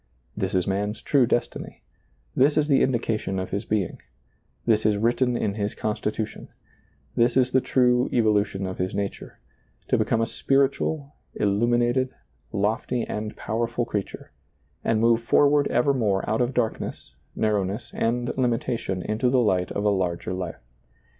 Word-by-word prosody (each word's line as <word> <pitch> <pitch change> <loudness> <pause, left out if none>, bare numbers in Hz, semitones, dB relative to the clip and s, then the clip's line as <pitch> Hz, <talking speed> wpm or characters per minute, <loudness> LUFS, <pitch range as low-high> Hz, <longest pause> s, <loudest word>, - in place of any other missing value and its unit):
This - - -2
is 90 -2 +2
man's 105 +2 -1
true 135 -2 +3
destiny; 120 - -2 0.5
this 140 +3 +4
is 150 -1 +3
the 140 -3 +4
indication 115 -6 0
of 95 0 -4
his 100 +3 -2
being; 105 -5 -1 0.6
this 110 -2 +3
is 105 -1 +2
written 120 +3 +1
in 100 - -1
his 105 0 -3
con 110 - -1
stitution; 110 -1 -4 0.7
this 120 +1 +3
is 130 -1 +3
the 130 - +3
true 125 0 +2
evolution 105 -4 +1
of 95 0 -5
his 90 0 -2
nature 100 -1 -4 0.3
— - - -39
to - - +3
become 115 - +1
a 115 - +2
spiritual, 140 +3 0 0.2
illuminated, 120 +5 +2 0.4
lofty 110 +4 0
and 105 0 -5
pow 110 - -3
erful 120 +1 0
creature, 105 -4 -4 0.5
and 110 - +1
move 115 0 +4
forward 145 +4 +4
evermore 120 -7 +1
out 110 +3 +1
of 125 +2 0
darkness, 115 -3 -2 0.2
narrowness, 105 +1 -1
and 120 +1 -1
limitation 115 -6 -1
into 110 +4 0
the 130 0 +3
light 95 -6 +1
of 100 - -2
a - - +5
larger 90 -2 -1
life. 90 -8 -5
115 Hz, 155 wpm, -25 LUFS, 100-125 Hz, 0.7 s, a